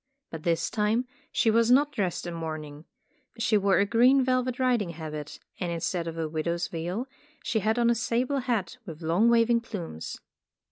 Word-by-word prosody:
But 160 - -6
this 165 0 0
time 220 +3 +1 0.3
she 225 - +3
was 230 +1 +3
not 285 +4 +5
dressed 195 - -2
in 175 - -4
mourning. 155 -2 -6 0.5
She 230 -1 +1
wore 200 -1 +3
a 200 - +4
green 250 +6 +5
velvet 255 -1 0
riding 245 -7 +1
habit, 155 -2 -7 0.2
and 175 -2 -2
instead 170 +1 -2
of 165 0 -5
a 160 -1 -1
widow's 170 +2 -2
veil 175 +9 -3 0.4
she 220 - 0
had 220 +2 0
on 235 0 +4
a - - +4
sable 245 +4 0
hat 240 -5 -2
with 165 -5 -9
long 175 +9 +3
waving 235 0 +4
plumes. 175 - -6
205 Hz, 180 wpm, -27 LUFS, 165-235 Hz, 0.5 s, not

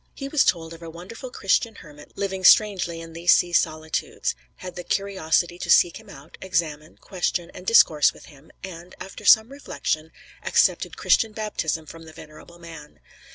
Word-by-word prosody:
He 275 - -6
was 280 0 +2
told 165 -1 -1
of 165 - -13
a 165 - -8
wonderful 185 +10 -10
Christian 225 0 0
hermit 150 -4 -15
living 190 -1 -3
strangely 185 -5 +4
in 165 0 -11
these 170 +1 +2
sea 175 -1 +1
solitudes; 155 -1 -1 0.2
had 180 -1 -9
the 180 - -7
curiosity 175 -2 -1
to - - -6
seek 175 - +5
him 220 -1 -16
out, 145 -3 -14
examine, 165 -4 -3
question, 175 -2 -3
and 180 - -12
discourse 155 -10 +5
with - - -16
him; 145 0 -18
and, 175 -1 -10
after 195 +3 -10
some 220 +3 +6
reflection, 160 - -4 0.3
accepted - - +1
Christian 225 -2 +2
baptism 185 -7 -3
from 165 +1 -12
the 160 - -13
venerable 160 +2 -14
man. 160 - -13
175 Hz, 170 wpm, -23 LUFS, 160-195 Hz, 0.3 s, some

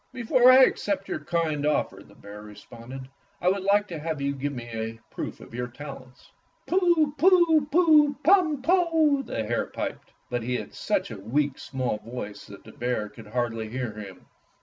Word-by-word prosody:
"Before 250 +1 +5
I 260 +1 +8
accept 200 -5 0
your - - -3
kind 155 -2 -1
oflFer," 150 0 -1
the - - -19
bear 105 +1 -11
responded, 120 +5 -11 0.3
"I 180 - +2
would 195 +1 0
like 205 +2 +2
to 165 -3 -5
have 160 -1 -3
you 140 0 -1
give 140 +1 -3
me 120 -4 -7
a 115 0 -5
proof - - -6
of - - -14
your 125 +1 -3
talents." 130 0 -11 0.3
"Pu, 345 -5 +2
pu, 340 -5 +5
pu, 300 -3 +5
pum, 320 -5 +3
poh!" 325 -4 +3
the 115 - -4
hare 115 +2 -1
piped. - - -6 0.2
But 120 0 -1
he 125 +2 -2
had - - -8
such - - -1
a - - -7
weak, 135 +7 -1
small 130 -5 -3
voice 110 -4 -8
that 100 - -12
the 110 - -13
bear 120 -3 -3
could 105 +1 -13
hardly 115 -1 -2
hear 125 -1 -3
him. 100 -4 -10
145 Hz, 185 wpm, -26 LUFS, -, 0.3 s, I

